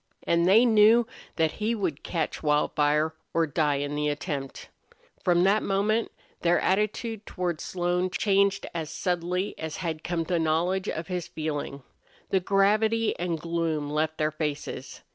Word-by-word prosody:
And 170 +1 +2
they 220 +6 +6
knew 225 +1 +6 0.3
that 160 -2 +2
he 220 +2 -1
would 180 -9 -2
catch 165 -3 -3
Wildfire 150 +1 +2 0.2
or 165 0 +3
die 150 -1 +1
in 145 +1 -2
the 150 0 0
attempt. 145 -2 -5 0.5
From 175 -1 +3
that 200 +3 +4
moment 210 +3 0 0.3
their 175 0 +3
attitude 210 +2 0
toward 175 -3 -3
Slone 180 0 -1
changed 200 0 +2
as 160 -3 -4
subtly 180 +3 -1
as 160 -1 -4
had 165 -3 -4
come 170 -1 -1
the 175 0 0
knowledge 175 +5 0
of 165 - -3
his 180 -1 -4
feeling. 145 -4 -4 0.5
The 190 - +4
gravity 215 +4 +2
and 170 -2 -1
gloom 165 -3 -2
left 155 +1 0
their 155 0 +1
faces. 150 -1 -5
175 Hz, 150 wpm, -27 LUFS, 155-195 Hz, 0.5 s, they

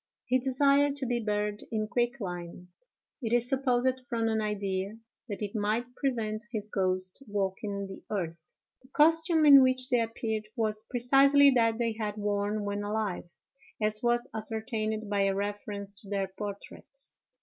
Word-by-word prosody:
He 255 +1 +2
desired 280 +2 +3
to 280 -2 -3
be 245 -1 0
buried 210 -1 -1
in 215 -1 -1
quicklime—it 220 - -5
is 240 0 +3
supposed 260 -1 +2
from 230 -1 0
an 220 0 +1
idea 200 -1 -2 0.3
that 205 +1 -4
it 205 - -4
might 220 +4 -1
prevent 225 -5 -2
his 215 -3 -4
ghost 185 +2 -1
walking 200 0 -2
the 195 0 -9
earth. 170 -6 -4 0.3
The 255 - -20
costume 320 +3 +4
in 280 -2 +10
which 255 0 +2
they 245 -2 +3
appeared 220 -1 -3
was 215 -2 -1
precisely 275 +3 +5
that 230 -3 +3
they 230 -1 0
had 215 -1 -4
worn 205 0 -1
when 205 0 -2
alive, 205 -4 -3 0.5
as 215 0 +1
was 240 0 +1
ascertained 220 0 -3
by 205 -1 0
a 195 0 +1
reference 205 0 -4
to 200 - -14
their 195 -2 -1
portraits. 210 - -6
220 Hz, 150 wpm, -29 LUFS, 205-245 Hz, 0.5 s, in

